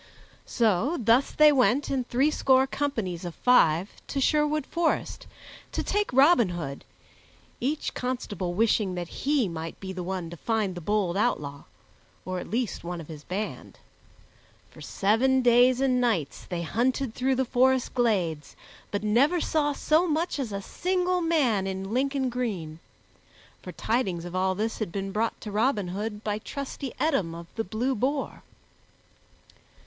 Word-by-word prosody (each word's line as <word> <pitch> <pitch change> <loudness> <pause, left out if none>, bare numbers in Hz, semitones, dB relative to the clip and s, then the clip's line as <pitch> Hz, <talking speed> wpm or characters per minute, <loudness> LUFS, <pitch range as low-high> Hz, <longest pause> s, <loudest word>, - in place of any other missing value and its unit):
So 230 - +1
thus 235 +4 +3
they 305 0 +6
went 270 0 +2
in 260 -2 0
threescore 265 0 +3
companies 225 - -3
of 175 -2 -6
five 185 -7 +3 0.2
to 280 - -2
Sherwood 300 +1 +2
Forest, 340 -1 -1 0.5
to - - -1
take 415 0 0
Robin 265 - +5
Hood, 155 -6 -5 0.8
each 290 +5 -2
constable 205 -8 -3
wishing 210 -3 +2
that 175 -1 -5
he 280 -5 0
might 165 -1 -6
be 190 -1 -6
the 185 - -5
one 180 -2 -4
to 170 - -8
find 215 0 -1
the 175 - -7
bold 195 0 0
outlaw, 145 -11 -1 0.6
or 185 0 -3
at - - -8
least 235 -5 -2
one 175 0 -5
of 165 - -10
his 150 -2 -9
band. 200 +6 -5 0.9
For - - -14
seven 255 +6 +2
days 245 +1 +5
and 255 -2 +2
nights 210 - -1
they 175 -1 -4
hunted 245 +6 0
through 260 +2 +1
the 265 +1 +1
forest 260 +1 +2
glades, 185 - 0 0.3
but 205 0 -3
never 270 +12 +3
saw 305 -2 +1
so 310 +4 +2
much 320 0 -1
as 250 -6 -3
a 200 0 -4
single 365 - 0
man 265 - +2
in 190 +2 -4
Lincoln 270 +1 0
green; 195 -11 -4 0.8
for - - -8
tidings 195 -8 -1
of 175 +1 -7
all 190 0 +1
this 220 +3 -2
had 215 -6 -3
been 195 +1 -4
brought 225 +3 -1
to 210 - -6
Robin 210 -3 +1
Hood 210 +3 -4
by 210 0 -2
trusty 275 +2 -6
Eadom 205 - 0
o' 170 0 -8
the 225 - -1
Blue 230 +7 -1
Boar. 270 +4 -2
230 Hz, 155 wpm, -27 LUFS, 185-270 Hz, 0.9 s, they